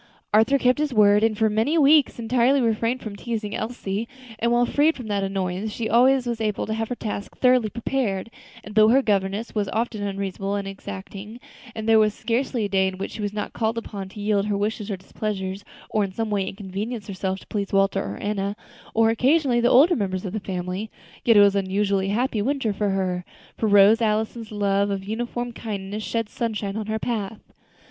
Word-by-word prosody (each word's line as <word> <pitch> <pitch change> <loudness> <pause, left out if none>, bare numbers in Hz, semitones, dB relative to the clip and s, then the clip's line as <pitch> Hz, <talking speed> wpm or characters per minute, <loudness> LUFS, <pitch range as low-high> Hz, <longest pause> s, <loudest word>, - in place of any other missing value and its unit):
Arthur 225 +6 +5
kept 255 +1 +2
his 300 -2 0
word, 205 -1 +6
and 220 -1 +2
for 220 0 +3
many 220 +10 +1
weeks 295 -1 +5
entirely 245 +3 +2
refrained 230 +1 0
from 215 -2 -6
teasing 215 -1 -4
Elsie, 220 -2 -3 0.3
and 235 +1 +1
while 240 0 +4
freed 295 +6 +2
from 250 - -7
that 200 -1 0
annoyance 195 +1 -2
she 230 - -5
was 220 - -1
always 245 -1 +3
able 210 -2 -1
to 220 - -3
have 225 0 -2
her 245 - -2
tasks 210 -3 -5
thoroughly 250 -3 +3
prepared; 230 -3 -2 0.3
and 210 - -10
though 215 0 +6
her 265 +4 +4
governess 200 +1 0
was 205 -2 -1
often 225 -1 -2
unreasonable 195 0 -3
and 200 -1 -3
exacting, 200 +3 -8 0.4
and 220 0 -5
there 225 -1 +6
was 215 -1 +2
scarcely 235 0 -1
a - - 0
day 190 -1 +2
in 190 0 -4
which 195 - -4
she - - -7
was 205 -1 -2
not 210 0 -4
called 225 0 -1
upon 200 -4 -6
to 200 - -11
yield 205 -1 +1
her 205 - 0
own - - -2
wishes 215 0 -2
or 200 - -2
pleasures, 195 0 -4 0.3
or 215 - +2
in 195 - -3
some 220 +2 -3
way 200 -2 +1
to - - -3
inconvenience 205 +3 -5
herself 190 -1 -3
to - - -14
please 200 -2 -3
Walter 195 0 +2
or 100 +1 -5
Enna, 200 -1 -2 0.4
or 225 0 +4
occasionally 260 +1 +3
the 240 - +4
older 305 +8 +6
members 190 -2 -2
of 185 - -4
the 215 - -1
family, 185 +2 -4 0.3
yet 230 -3 +5
it - - +9
was 200 -1 +5
an 200 -1 +1
unusually 195 0 0
happy 225 +1 0
winter 260 -2 0
to 205 +1 -1
her, 185 -2 -1 0.3
for 220 - -1
Rose 205 +2 +6
Allison's 220 +1 -1
love 200 -1 +1
and 195 -1 -3
uniform 240 +3 -3
kindness 205 -2 -5
shed 230 0 -2
sunshine 210 -3 -3
on 215 -1 -4
her 220 0 -1
path. 220 -2 -4
215 Hz, 215 wpm, -24 LUFS, 200-230 Hz, 0.4 s, it